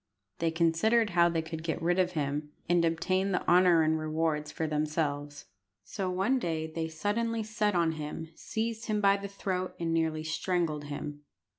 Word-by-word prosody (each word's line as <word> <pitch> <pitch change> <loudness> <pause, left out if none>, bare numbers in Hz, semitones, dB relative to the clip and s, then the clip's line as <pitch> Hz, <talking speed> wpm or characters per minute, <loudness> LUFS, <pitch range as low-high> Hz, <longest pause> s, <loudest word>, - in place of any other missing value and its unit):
They 165 - +2
considered 170 +7 +2
how 170 0 +5
they 165 -1 -1
could 160 0 -6
get 160 0 -2
rid 175 +2 +1
of 180 -1 +2
him, 150 -1 -2 0.2
and 175 0 +3
obtain 185 +4 +1
the - - -1
honour 175 -2 +6
and 160 0 +2
rewards 155 -1 -1
for 160 - -2
themselves. 150 -1 -2 0.4
So 190 - -3
one 195 +9 +1
day 160 -6 -2
they 160 0 -3
suddenly 220 +8 -1
set 210 -2 0
on 170 -2 +3
him, 155 +1 -6
seized 225 +4 -3
him 215 -1 +1
by 200 -1 +4
the 200 0 -6
throat, 185 -2 -3
and 165 -1 -1
nearly 160 -1 0
strangled 160 -2 -1
him. 145 0 -6
165 Hz, 175 wpm, -30 LUFS, 155-190 Hz, 0.4 s, honour